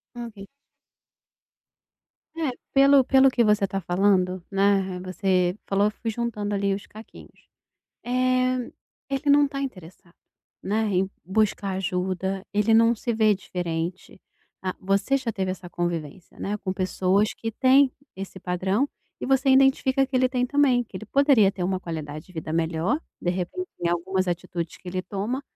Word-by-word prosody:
Ok. 225 -5 -8 1.9
É, 315 -4 0 0.2
pelo 275 -1 +6
pelo 270 0 +5
que 240 - +2
você 210 -2 +3
tá 195 +1 -3
falando, 185 0 +1
né, 200 0 +3
re 185 -1 -5
você 185 0 0
falou, 200 +1 +2
eu - - +2
fui 225 +2 -5
juntando 210 -3 -3
ali 200 0 +1
os 200 - -7
caquinhos. 220 +1 -15 0.6
Eh, 255 0 +1 0.4
ele 280 +1 0
não 285 0 +5
tá 275 -1 -5
interessado, 185 -8 -8 0.5
né, 215 +3 0
em 190 -1 0
buscar 200 0 0
ajuda, 190 +1 -2
ele 210 +2 +3
não 230 +1 +5
se 235 +1 -3
vê 215 -1 +4
diferente. 180 -1 -5 0.4
Ah, 185 -1 -2
você 195 +8 +1
já 255 -4 -2
teve 190 -2 -2
essa 185 -1 -7
convivência, 170 -1 -4
né, 205 +1 -2
com 190 -2 -3
pessoas 190 +2 +1
que 225 - -4
têm 260 +3 +4 0.2
esse 190 0 -7
padrão 190 +8 0 0.3
e - - -3
você 270 +1 +3
identifica 270 0 +4
que 265 - -11
ele 255 0 +3
tem 250 -1 0
também, 265 -3 +3
que 210 - -10
ele 215 +2 -8
poderia 275 -6 +4
ter 185 - -5
uma 185 0 -1
qualidade 155 -2 -6
de 185 - -17
vida 160 -2 -5
melhor, 165 - 0 0.2
de 175 - 0
repente, 190 - -4
em 170 - 0
algumas 185 +2 0
atitudes 175 -1 -4
que 185 - -11
ele 185 +1 -3
toma. 210 +9 -3
200 Hz, 160 wpm, -25 LUFS, 185-250 Hz, 1.9 s, pelo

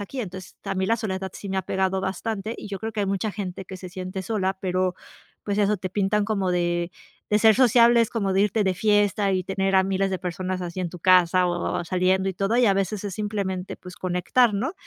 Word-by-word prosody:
aquí 250 +6 -5
entonces 185 -3 -8
a - - -2
mí 190 0 0
la 230 +4 +2
soledad 190 -4 -3
sí 200 - -8
me 190 - -2
ha 190 - 0
pegado 190 +1 0
bastante 195 +3 -3
y - - -7
yo 200 -2 -6
creo 220 - -3
que 220 - -7
hay 200 - 0
mucha 200 +2 -1
gente 190 -1 -5
que 190 - -8
se 185 0 -9
siente 185 +1 -5
sola, 190 -2 -1
pero 185 -1 0 0.5
pues 205 0 -1
eso, 210 +1 +3
te 185 -1 -5
pintan 205 +2 +1
como 195 -4 0
de 175 -1 0 0.4
de 210 - +4
ser 220 0 +6
sociable 240 -1 +5
es 225 - -2
como 200 -4 -1
de 190 - +2
irte 210 +1 +1
de 190 -1 +1
fiesta 205 0 +2
y 185 - +1
tener 195 0 -1
a 190 - +5
miles 195 0 0
de 190 - -2
personas 185 +1 -3
así 175 +1 -5
en 175 - -2
tu 180 - -9
casa 180 0 +4
o 175 0 -1
saliendo 185 +2 +1
y 190 - -3
todo, 195 +5 0
y 245 - +4
a 195 - +4
veces 195 +1 -2
es 200 -3 -4
simplemente 200 -3 -3
pues 180 0 -11
conectar, 185 +6 +2
¿no?, 245 - -1
190 Hz, 240 wpm, -24 LUFS, 185-210 Hz, 0.5 s, ser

